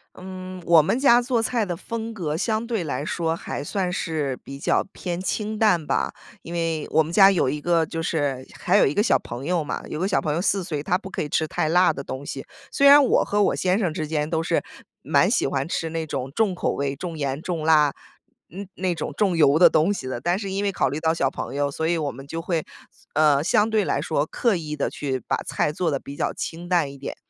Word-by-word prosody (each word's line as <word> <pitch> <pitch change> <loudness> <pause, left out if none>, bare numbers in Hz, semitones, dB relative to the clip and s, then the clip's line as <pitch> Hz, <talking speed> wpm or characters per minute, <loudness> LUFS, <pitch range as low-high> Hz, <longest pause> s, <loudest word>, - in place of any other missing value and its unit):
嗯， 185 0 -8
我 165 -2 +7
们 225 - 0
家 245 -3 +5
做 240 -1 0
菜 230 -2 0
的 180 -3 -3
风 230 +5 -5
格 165 -8 -3
相 220 +5 -1
对 225 -7 -2
来 145 - -3
说， 165 +2 -1
还 165 - -5
算 185 +2 -2
是 155 -6 -2
比 140 0 -8
较 - - +1
偏 175 -2 -4
清 210 +3 -3
淡 180 -8 +3
吧。 - - 0 0.3
因 170 - -9
为 165 -2 -1
我 160 - +4
们 160 - -7
家 195 +1 +7
有 180 -8 +1
一 145 +2 -3
个 170 -1 +2
就 165 0 -4
是 145 -5 -1
还 180 - +2
有 - - +6
一 135 - +2
个 205 - +2
小 230 - +3
朋 120 +4 -8
友 175 -2 0
嘛， - - -4
有 - - -5
个 185 - 0
小 200 - +1
朋 150 -2 -1
友 165 - 0
4 195 0 +1
岁， 155 -5 -4
他 180 +3 +1
不 195 - -9
可 - - -3
以 150 - -5
吃 160 - +1
太 155 - -1
辣 180 +2 +4
的 140 - -6
东 135 +2 -6
西。 135 - -6 0.3
虽 280 - +3
然 285 +1 +9
我 265 - +3
和 205 0 +1
我 - - +2
先 185 +1 +1
生 180 -8 0
之 155 -1 -3
间 150 -1 -1
都 160 0 0
是， - - 0 0.4
蛮 - - +2
喜 - - +2
欢 135 0 -1
吃 165 -1 -2
那 160 0 -3
种 130 -3 -4
重 210 -5 +1
口 - - -1
味 140 -1 -2
重 165 +3 -6
盐 140 -1 -2
重 170 -3 -3
辣， 150 -3 +4 0.5
那 195 +4 -8
那 185 -2 -1
种 155 -2 -5
重 195 -4 +2
油 150 -2 +4
的 180 - +7
东 165 +7 +2
西 130 - -6
的。 125 -2 -4
但 175 +5 0
是 200 -2 -5
因 195 +1 -2
为 200 - +1
考 135 - 0
虑 145 - -4
到 160 0 +1
小 135 -5 +1
朋 135 - -6
友， 145 0 0
所 160 +3 -2
以 170 - +1
我 150 -4 -2
们 135 +3 -11
就 165 +3 -5
会， 165 -2 -1 0.5
呃， 150 -2 +4
相 210 +7 +2
对 220 -1 +2
来 140 - 0
说 155 -2 0
刻 230 +2 0
意 150 -3 -5
地 - - -1
去 135 -3 -3
把 - - 0
菜 150 - -1
做 170 0 -1
得 140 - -1
比 140 +1 -10
较 - - -1
清 170 +1 -6
淡 170 -6 +1
一 140 - -12
点。 - - -6
165 Hz, 275 characters per minute, -23 LUFS, 150-190 Hz, 0.5 s, 然